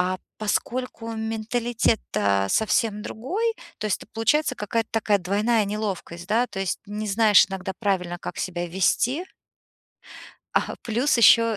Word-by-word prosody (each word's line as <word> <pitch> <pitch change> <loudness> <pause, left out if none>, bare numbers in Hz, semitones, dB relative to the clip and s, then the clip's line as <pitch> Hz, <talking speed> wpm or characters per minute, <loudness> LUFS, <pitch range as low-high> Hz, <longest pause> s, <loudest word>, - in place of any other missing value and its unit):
А 185 +1 +1 0.2
поскольку 230 +2 -2
менталитет-то 220 - 0
совсем 220 -1 +1
другой, 390 - -2 0.3
то - - -2
есть 210 - +1
это - - -12
получается 260 +6 +2
какая-то 225 0 -2
такая 215 -2 +2
двойная 210 +4 +1
неловкость, 195 -4 -4
да, 230 +4 +2
то 195 - -6
есть 195 - -1
не 210 +1 -4
знаешь 210 0 +6
иногда 190 0 -4
правильно, 185 -5 0
как - - -6
себя 175 -1 -3
вести 230 - +1 1.3
А, - - +1
плюс 245 +6 +1
ещё 230 -1 +6
215 Hz, 135 wpm, -24 LUFS, 195-230 Hz, 1.3 s, знаешь